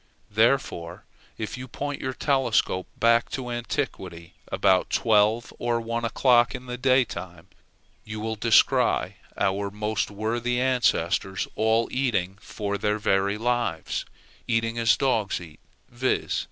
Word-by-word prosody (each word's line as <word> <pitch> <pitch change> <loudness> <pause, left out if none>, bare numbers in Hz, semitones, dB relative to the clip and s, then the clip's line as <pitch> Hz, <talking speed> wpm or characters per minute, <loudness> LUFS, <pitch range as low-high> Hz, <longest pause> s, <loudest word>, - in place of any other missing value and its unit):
Therefore, 105 -6 0 0.3
if 110 +3 -5
you 130 - -7
point 145 +3 -5
your 130 -1 -3
telescope 130 -9 +1
back 115 0 +3
to 125 -2 -4
antiquity 95 - -4 0.2
about 95 -1 +3
twelve 110 -1 +2
or 120 -1 0
one 115 +1 -3
o'clock 120 -1 +3
in 125 - -8
the 125 -1 -5
daytime, 125 -10 0 0.6
you 105 0 -7
will 110 +1 -3
descry 110 +1 +3 0.2
our 100 +1 0
most 105 +1 -2
worthy 115 +4 -1
ancestors 100 -7 +1
all 110 +1 +2
eating 100 -8 -1
for 100 -1 -4
their 105 +1 0
very 100 0 +1
lives, 120 -8 -1 0.4
eating 115 0 0
as 115 -2 +4
dogs 115 -7 0
eat, 80 -4 -12 0.3
viz. 125 +2 -1
115 Hz, 125 wpm, -25 LUFS, 100-120 Hz, 0.6 s, as